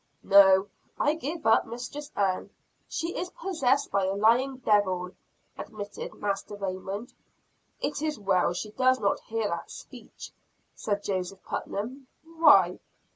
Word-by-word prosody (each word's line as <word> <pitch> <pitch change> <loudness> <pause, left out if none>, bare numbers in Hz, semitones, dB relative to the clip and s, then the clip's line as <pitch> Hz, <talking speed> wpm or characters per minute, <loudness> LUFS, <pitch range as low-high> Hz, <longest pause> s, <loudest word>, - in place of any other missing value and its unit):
"No, 195 -1 +7 0.3
I 290 - +3
give 320 0 -5
up 225 - +4
Mistress 285 +5 -7
Ann, 190 -2 0 0.4
she 330 +1 -3
is 360 +1 -3
possessed 285 -9 0
by 195 -1 +1
a 190 +1 -1
lying 240 +6 +3
devil," 190 -6 +1 0.5
admitted 205 -1 -7
Master 200 0 -3
Raymond. 195 +3 -5 0.7
"It 290 0 -2
is 310 -2 -1
well 190 -4 +2
she 210 +4 -5
does 255 +2 +2
not 200 -2 +1
hear 225 -1 -2
that 170 0 -4
speech," - - -11 0.4
said 205 -1 -3
Joseph 190 -1 -3
Putnam. 255 +7 -5 0.2
"Why?" 300 - +5
210 Hz, 130 wpm, -27 LUFS, 195-275 Hz, 0.7 s, No